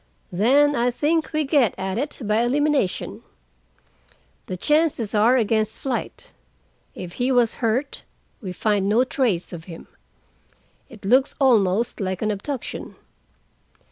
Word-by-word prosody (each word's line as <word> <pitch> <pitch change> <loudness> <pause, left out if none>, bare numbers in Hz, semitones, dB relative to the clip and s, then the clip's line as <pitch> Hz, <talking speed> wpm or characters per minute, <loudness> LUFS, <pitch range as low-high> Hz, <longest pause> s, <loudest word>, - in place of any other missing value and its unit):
"Then 275 +10 +3
I 240 0 +2
think 305 +6 0
we 310 0 0
get 275 - +2
at 190 +2 -3
it 285 0 -4
by 215 +2 +2
elimination. 275 -4 0 1.3
The 185 - -4
chances 295 - +1
are 225 +4 +4
against 220 -2 0
flight. 260 -3 -4 0.6
If 175 -1 -8
he 255 +2 +2
was 245 -3 +3
hurt, 245 +5 -1 0.4
we 190 -5 -5
find 200 +1 0
no 230 +4 +4
trace 235 -10 -1
of 165 -1 -8
him. 165 -2 -10 1.0
It 220 -6 -13
looks 260 +6 +3
almost 225 -5 +2
like 190 0 -2
an 215 - +1
abduction. 235 +6 -5
235 Hz, 130 wpm, -23 LUFS, 200-270 Hz, 1.3 s, are